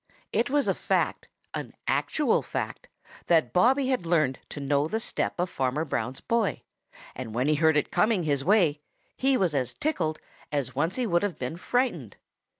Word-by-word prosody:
It 235 - +1
was 285 +1 +2
a - - +3
fact, - - -1 0.3
an - - -5
actual 295 -7 +2
fact, - - -4 0.4
that 160 -8 +3
Bobby 260 +7 +4
had 255 -8 +1
learned 155 -6 +1
to - - -7
know 140 +1 +1
the 220 +7 -1
step 220 - -1
of 180 - +1
Farmer 135 -1 -1
Brown's 130 -3 -3
boy, 230 -3 0 0.5
and 115 -3 -7
when 125 +3 +1
he 155 - +4
heard 160 0 +3
it 150 - 0
coming 210 -4 +2
his 140 -3 0
way, 170 -6 +3 0.3
he 265 0 +2
was 180 -7 +1
as 130 -3 -1
tickled 160 - -1 0.3
as 140 -4 -1
once 160 +6 0
he 255 - 0
would 175 -5 +2
have 205 -4 -2
been 125 +5 -4
frightened. 175 - -1
165 Hz, 180 wpm, -27 LUFS, 140-225 Hz, 0.5 s, Bobby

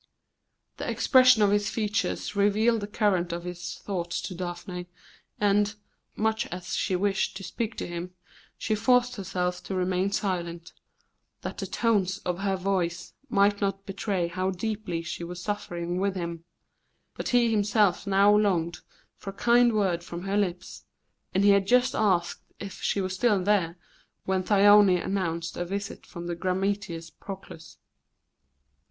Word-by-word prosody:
The - - -4
expression 255 -4 +5
of 200 - +4
his 205 0 +2
features 215 -1 -2
revealed 215 +3 +3
the 205 - -4
current 200 -5 +1
of 170 0 -4
his 175 0 -6
thoughts 175 -4 -3
to - - -5
Daphne, 180 0 -6 0.5
and, 205 0 +2 0.4
much 220 0 0
as 180 0 -5
she 185 - 0
wished 195 0 0
to 195 - -8
speak 220 +4 -4
to - - -3
him, 175 +1 -6 0.4
she 220 - -1
forced 250 +2 +2
herself 180 -2 -2
to 190 - -4
remain 185 +1 0
silent, 175 -4 -3 0.7
that - - -6
the - - -3
tones 200 -5 +1
of 180 0 -1
her 195 -1 0
voice 180 -2 -2 0.2
might 200 -2 +3
not 195 -1 -1
betray 195 -2 -1
how 185 +2 -2
deeply 190 -3 -3
she 175 0 -5
was 175 +1 -6
suffering 180 -3 -3
with 195 0 0
him; 170 -2 -5 0.7
but - - -4
he 240 -2 +3
himself 205 -2 +2
now 200 +1 +5
longed 180 -5 +1 0.4
for 195 - -7
a - - -6
kind 240 +3 +4
word 190 -5 +1
from 170 +1 -7
her 195 +1 -2
lips, 185 -4 -2 0.5
and 190 - +1
he 200 - +7
had 200 -1 +3
just 250 +2 +4
asked 180 -5 +1 0.2
if 200 -1 -8
she 200 - 0
was 185 0 -2
still 200 -1 +2
there 185 -4 +1 0.5
when 190 -1 +1
Thyone 205 -1 +6
announced 170 -3 -2
a 175 - -1
visit 200 +3 -5
from 170 -2 -8
the 175 - -2
grammateus 185 -2 -2
Proclus. 185 - -10
195 Hz, 155 wpm, -27 LUFS, 175-205 Hz, 0.7 s, he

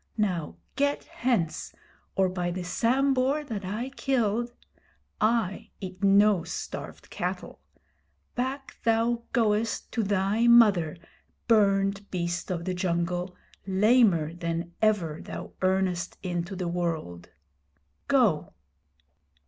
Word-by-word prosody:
Now 180 -8 -1 0.2
get 285 +1 +1
hence, 225 -11 -1 0.4
or 190 0 +3
by 180 -1 -2
the 180 +1 -4
Sambhur 265 +8 +1
that 220 -8 -5
I 215 +7 -3
killed 240 -4 0 0.7
(I 215 -3 +1
eat 185 0 -8
no 200 -2 +5
starved 170 - -7
cattle), - - -4 0.7
back 265 +2 -4
thou 230 +1 +2
goest 225 -2 0
to 230 - 0
thy 205 +3 +1
mother, 205 -10 +5 0.5
burned 200 -2 +3
beast 175 -1 -3
of 170 -2 -3
the 185 - -1
jungle, 180 0 -1 0.3
lamer 190 -5 +4
than 170 0 -3
ever 185 -8 +1
thou - - -8
earnest 185 -2 0
into 175 +1 -3
the 180 -1 -3
world! 165 - -3 0.8
Go!' 225 - +2
195 Hz, 110 wpm, -27 LUFS, 175-230 Hz, 0.8 s, no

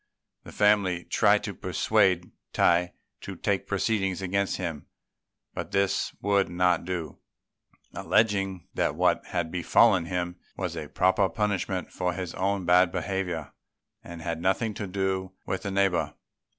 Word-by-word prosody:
The - - -10
family 100 -4 +2
tried - - +3
to - - -4
persuade 90 -2 +1 0.2
Tai 90 0 +3 0.3
to - - -7
take - - -1
proceedings 95 -5 0
against 95 +1 -1
him, 85 -5 -5 0.7
but - - -6
this 100 -1 +1
he - - -23
would 100 -1 +2
not 90 -1 +1
do, 85 -4 -4 0.7
alleging 95 -5 +1
that - - 0
what - - +2
had 85 -3 -2
befallen 90 0 +4
him 90 0 -3 0.2
was 90 -3 -3
a 80 -2 -5
proper 95 +4 +2
punishment 95 -1 -2
for 90 -1 -1
his 90 -2 -5
own 95 0 -1
bad 90 0 +5
behaviour, 90 -7 -3 0.5
and 85 -1 -9
had 85 -1 -3
nothing 95 +5 +1
to 105 0 -5
do 95 0 -2
with 95 - -3
the 100 - -4
neighbour. 95 -2 +1
95 Hz, 145 wpm, -27 LUFS, 90-95 Hz, 0.7 s, bad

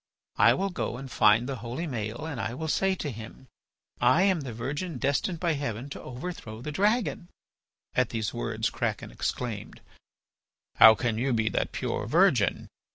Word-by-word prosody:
I - - +6
will 195 +1 -1
go 180 -9 -3
and 135 0 -8
find 110 +3 +4
the 135 -1 -3
holy 120 +9 -4
Maël 115 -3 -4
and 140 -8 -4
I 115 - -3
will 160 +4 -4
say 190 +4 +2
to 150 -6 -4
him: 115 +3 -10 0.6
'I 175 - +5
am 190 -5 +2
the 135 -3 -5
virgin 140 +8 -4
destined 150 - 0
by 170 -2 +1
Heaven 135 -3 -4
to - - -6
overthrow 125 -5 -7
the 150 +6 -5
dragon.'" 205 0 0 0.6
At 130 -2 +2
these 110 -2 -2
words - - -2
Kraken - - -3
exclaimed: 115 -5 -4 1.0
"How 110 0 +10
can 115 -2 -1
you 130 +1 +1
be 110 -1 +1
that - - -1
pure - - -3
virgin? - - +3
130 Hz, 170 wpm, -28 LUFS, 115-165 Hz, 1.0 s, How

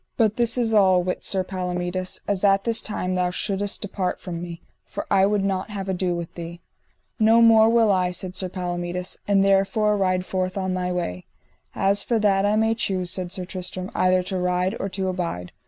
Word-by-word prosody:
But 220 -3 +2
this 235 0 +1
is 230 -2 0
all: 190 -4 +5
wit 180 0 -3
Sir 190 -1 0
Palomides, 180 0 -3
as 200 -2 -1
at 195 -1 +4
this 230 -1 0
time 185 -3 -3
thou 180 -1 +1
shouldest 200 +3 -2
depart 190 -2 -3
from 170 -2 -6
me, 170 -1 -7 0.3
for - - -5
I 195 0 +5
would 205 -1 +1
not 195 +1 -1
have 200 -2 -5
ado 185 -1 -1
with 170 -1 -6
thee. 170 0 -8 0.6
No 225 +1 +5
more 225 -1 +6
will 230 -2 +4
I, 185 -2 +2
said 180 0 -5 0.2
Palomides, 180 0 -4
and 195 -1 +3
therefore 195 +2 +2
ride 185 -2 0
forth 185 0 -2
on 190 -1 -1
thy 180 0 -2
way. 90 - -4 0.5
As 200 +1 +2
for 235 - 0
that 200 -2 +2
I 210 - +2
may 220 +1 +2
choose, 185 -5 -1
said 185 -2 -3
Sir 185 -2 -4
Tristram, 185 0 -5
either 185 0 +2
to 185 0 -3
ride 180 +2 0
or 195 - -2
to 190 0 -3
abide. 170 - -3
190 Hz, 200 wpm, -23 LUFS, 180-205 Hz, 0.6 s, more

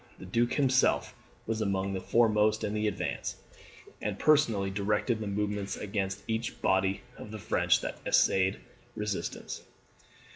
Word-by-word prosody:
The - - -10
Duke 120 +6 +1
himself 130 -3 +2 0.3
was 110 0 -2
among 100 -1 0
the 95 - -3
foremost 110 -1 +3
in 105 - -1
the 105 0 0
advance, 100 -2 -2 0.7
and - - -2
personally 115 -11 +3
directed 105 +3 0
the 110 - -4
movements 100 0 -2
against 95 -1 -3
each 115 +1 -2
body 95 +1 +2 0.2
of - - -8
the 110 - -6
French 105 - +2
that - - -5
essayed 95 +1 +3 0.4
resistance. 105 -2 -4
105 Hz, 140 wpm, -30 LUFS, 100-110 Hz, 0.7 s, foremost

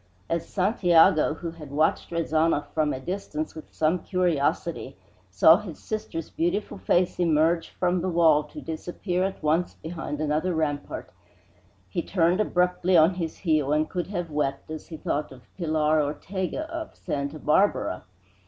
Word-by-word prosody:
As 170 -1 -1
Santiago, 175 -6 +4
who 170 0 -5
had 160 -3 -11
watched 155 +3 +1
Rezanov 165 -2 +1
from 155 -2 +1
a 130 - -3
distance 155 -1 -4
with 155 - -11
some 160 +3 +1
curiosity, 170 -5 -1 0.3
saw 100 - +6
his 195 -7 -8
sister's 190 -7 -5
beautiful 190 +4 -1
face 180 -1 +1
emerge 165 0 +2
from 180 -1 0
the 185 - -1
wall 165 -3 +4
to 150 - -10
disappear 175 +3 -3
at 190 -4 -3
once 160 +4 +1
behind 160 -2 -6
another 155 +4 0
rampart, 145 -2 -3 0.8
he 130 - -2
turned 175 +1 +1
abruptly 180 -2 +2
on 160 +3 +6
his 170 -3 -4
heel 155 -5 +1
and 155 +1 +1
could 180 -2 -2
have 175 -4 -4
wept 145 0 -2
as 155 - -7
he 160 - -8
thought 150 -1 -2
of 125 -2 -13
Pilar 155 -3 +2
Ortego 185 - -3
of 325 0 -6
Santa 140 +1 -4
Barbara. 150 - +1
165 Hz, 155 wpm, -26 LUFS, 150-180 Hz, 0.8 s, saw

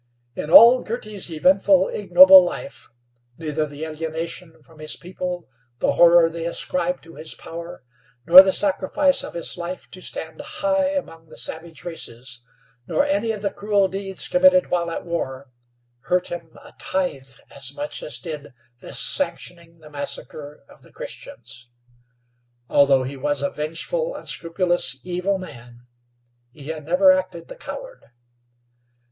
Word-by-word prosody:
In 150 - -6
all 235 +8 +8
Girty's 215 -4 -5
eventful, 185 +3 +3
ignoble 185 -1 +7
life, 225 +9 -7 0.5
neither 155 -1 -2
the 145 +2 -7
alienation 160 +1 -6
from 155 +3 -19
his 155 0 -3
people, 180 -1 -6 0.3
the - - +1
horror 170 -1 +6
they 165 0 -5
ascribed 180 +1 -2
to 165 - -15
his 155 - -6
power, 170 -2 -9 0.4
nor 180 +3 +11
the 190 0 +1
sacrifice 205 +9 +2
of - - -9
his 170 - -4
life 175 +1 -7
to 185 - -11
stand 160 - -6
high 290 -1 -1
among 165 - -6
the - - -14
savage 165 +1 -5
races, 125 -7 -7 0.5
nor 285 - +1
any 290 -6 0
of 210 -2 -6
the 200 - -1
cruel 205 -1 +1
deeds 195 0 -3
committed 275 0 +4
while 170 -1 0
at 165 - -6
war, 135 -6 -5 0.5
hurt 180 +7 -1
him 170 -2 -8
a - - -15
tithe 140 -8 -3 0.2
as 135 -2 -3
much 295 +8 -5
as - - -3
did 150 -6 -8 0.2
this - - -4
sanctioning 170 - -1
the 155 - -14
massacre 145 0 -6
of - - -19
the - - -20
Christians. 120 +1 -10 1.0
Although 135 -2 +4
he 135 +2 -6
was 145 +1 -1
a 140 - -1
vengeful, 480 - -3
unscrupulous, 170 -5 0
evil 180 +2 -1
man, 120 -9 -12 0.7
he 140 +3 -11
had 155 -2 -6
never 185 +4 +5
acted 185 -2 -2
the - - -9
coward. - - -9
170 Hz, 145 wpm, -22 LUFS, 155-190 Hz, 1.0 s, nor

